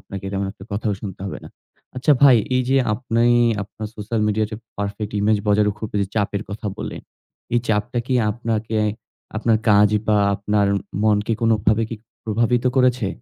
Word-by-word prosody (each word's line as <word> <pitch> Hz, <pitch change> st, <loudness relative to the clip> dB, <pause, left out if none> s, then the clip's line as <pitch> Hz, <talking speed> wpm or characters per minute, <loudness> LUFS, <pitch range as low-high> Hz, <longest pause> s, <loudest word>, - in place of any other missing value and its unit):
আপনাকে 100 Hz, 0 st, -8 dB
এরকম 100 Hz, 0 st, -2 dB
একটা 95 Hz, -, -13 dB
কথাও 105 Hz, 0 st, -1 dB
শুনতে 95 Hz, -3 st, -7 dB
হবে 95 Hz, -, -5 dB
না। -, -, -9 dB, 0.5 s
আচ্ছা 145 Hz, +4 st, +3 dB
ভাই, 130 Hz, -4 st, +8 dB, 0.2 s
এই 130 Hz, -, +2 dB
যে 135 Hz, -, +3 dB, 0.2 s
আপনি, 115 Hz, 0 st, 0 dB, 0.4 s
আপনার 105 Hz, +2 st, -7 dB
সোশ্যাল 110 Hz, +2 st, -2 dB
মিডিয়াতে 110 Hz, +1 st, 0 dB, 0.2 s
পারফেক্ট 100 Hz, +1 st, -4 dB
ইমেজ 105 Hz, +1 st, +3 dB
বজায় 105 Hz, 0 st, +4 dB
রাখার 105 Hz, 0 st, -1 dB
খুব 110 Hz, -, -4 dB
এই -, -, +2 dB
যে 100 Hz, -, -2 dB
চাপের 105 Hz, -1 st, 0 dB
কথা 105 Hz, +1 st, -5 dB
বললেন, -, -, -6 dB, 0.5 s
এই 120 Hz, -, +4 dB
চাপটা 110 Hz, +3 st, 0 dB
কি 130 Hz, -, 0 dB, 0.2 s
আপনাকে, 110 Hz, -1 st, -2 dB, 0.6 s
আপনার 115 Hz, 0 st, +2 dB
কাজ 105 Hz, 0 st, +6 dB, 0.2 s
বা 105 Hz, -, +4 dB, 0.2 s
আপনার 105 Hz, 0 st, +1 dB, 0.4 s
মনকে 105 Hz, +1 st, +2 dB
কোনভাবে 110 Hz, -1 st, +2 dB
কি 115 Hz, -, -4 dB, 0.3 s
প্রভাবিত 115 Hz, +3 st, +1 dB
করেছে? 125 Hz, -1 st, +3 dB
110 Hz, 175 wpm, -21 LUFS, 105-115 Hz, 0.6 s, ভাই